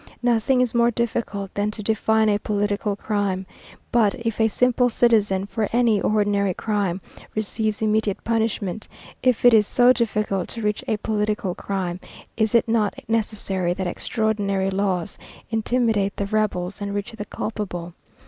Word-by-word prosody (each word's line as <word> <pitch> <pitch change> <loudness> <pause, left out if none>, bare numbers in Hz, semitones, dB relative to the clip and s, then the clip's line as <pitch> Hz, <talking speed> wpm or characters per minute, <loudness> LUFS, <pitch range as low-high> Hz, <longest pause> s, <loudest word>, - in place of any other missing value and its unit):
"Nothing 245 +2 +3
is 250 -3 0
more 235 0 +4
difficult 225 -4 -2
than 205 +1 0
to 210 0 -4
define 220 +1 +2
a 205 -1 +2
political 205 0 -1
crime. 200 -3 -1 0.5
But, 220 -4 +3
if 230 -3 -2
a 220 - +5
simple 250 +2 +2
citizen, 210 -5 +2
for 205 +1 -2
any 230 -4 +3
ordinary 205 -3 +1
crime, 200 -4 -1 0.3
receives 215 +1 -1
immediate 215 -2 0
punishment, 220 -3 -1 0.3
if 250 -2 +2
it 245 - +8
is 210 -2 +5
so 250 0 +5
difficult 210 -5 -1
to 230 - -5
reach 210 0 -1
a 220 - +1
political 210 -3 -1
crime, 185 -2 -3 0.4
is 220 0 +1
it 235 - +4
not 225 -3 +1
necessary 200 -5 -1
that 190 - -3
extraordinary 200 0 -1
laws... 190 -1 -1 0.3
intimidate 225 -3 +1
the 200 - -1
rebels 200 -2 -1
and 200 0 -3
reach 205 +4 -3
the 225 -2 -7
culpable? 180 -7 -5
210 Hz, 150 wpm, -23 LUFS, 200-225 Hz, 0.5 s, it